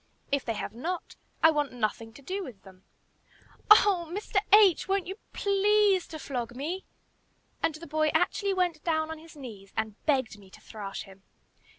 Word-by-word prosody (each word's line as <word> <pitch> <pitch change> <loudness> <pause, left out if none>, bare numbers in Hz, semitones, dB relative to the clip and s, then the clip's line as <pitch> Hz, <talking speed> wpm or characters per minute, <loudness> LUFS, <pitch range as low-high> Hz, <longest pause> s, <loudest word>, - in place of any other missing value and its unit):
If 280 -1 +1
they 230 - -2
have 210 - -5
not, 335 +10 -4 0.3
I 320 - +8
want 295 -4 -1
nothing 225 -1 -2
to 280 - -15
do 385 +7 -3
with 230 - -10
them." 190 -1 -17 0.8
"Oh! 395 -5 +6
Mr. 405 +2 -3
H., 405 -5 +6
won't 390 -1 +1
you 385 +4 -7
please 400 -1 +3
to 315 - -7
flog 245 -5 -4
me?" 330 +9 -4 0.8
And 315 - +1
the 325 +2 -9
boy 310 +1 +1
actually 390 +4 +1
went 350 -4 0
down 315 -1 0
on 320 - -6
his 325 0 -15
knees 210 -8 -10
and 220 -1 -3
begged 260 -7 +1
me 195 -2 -16
to - - -15
thrash 205 -3 -7
him. 195 0 -16
310 Hz, 180 wpm, -28 LUFS, 230-370 Hz, 0.8 s, I